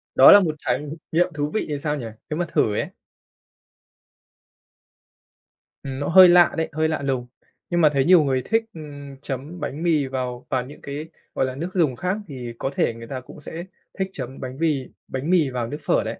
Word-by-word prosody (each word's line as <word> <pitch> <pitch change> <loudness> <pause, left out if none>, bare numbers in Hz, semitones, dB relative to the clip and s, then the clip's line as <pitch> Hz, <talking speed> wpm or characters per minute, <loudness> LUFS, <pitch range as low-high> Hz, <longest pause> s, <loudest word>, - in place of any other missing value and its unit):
Đó - - +10
là 205 - +10
một 160 -5 0
trải - - 0 0.3
nghiệm 170 +2 +3
thú 145 0 -2
vị 220 - 0
thì 145 -1 -2
sao 150 0 -1
nhỉ? 130 - -5 0.2
Nếu 155 +2 -3
mà 175 - +1
thử 105 - +2
ấy. - - -1 3.0
Ừm, 135 -1 -5
nó 145 - -2
hơi 185 +1 +9
lạ 175 0 +6
đấy, 160 - -1
hơi 155 +1 +1
lạ 155 -2 -2
lùng. 130 -3 -2 0.4
Nhưng 175 -1 +1
mà 155 - +7
thấy 135 -1 +2
nhiều 175 -2 +7
người 130 -2 +1
thích, 225 +1 +2
ừm, 145 -3 -9
chấm 145 +6 -6
bánh 155 +1 -4
mì 160 -5 +2
vào 125 -2 -4
vào 125 -1 0
những 145 - -12
cái, 145 +2 -5 0.3
gọi - - +2
là, 130 - -4
nước 165 +6 -4
dùng 155 -9 +2
khác 180 - -1
thì 125 -5 -7
có 135 - -2
thể 115 - +1
người 115 0 -10
ta 130 0 -4
cũng 140 - -13
sẽ 165 +3 -7 0.4
thích 190 0 0
chấm 130 -3 -7
bánh 130 0 -6
mì 150 -5 +1 0.2
bánh 135 +5 -4
mì 170 -6 +4
vào 125 -3 -3
nước 145 - -5
phở - - +2
đấy. - - -5
145 Hz, 215 wpm, -23 LUFS, 130-165 Hz, 3.0 s, Đó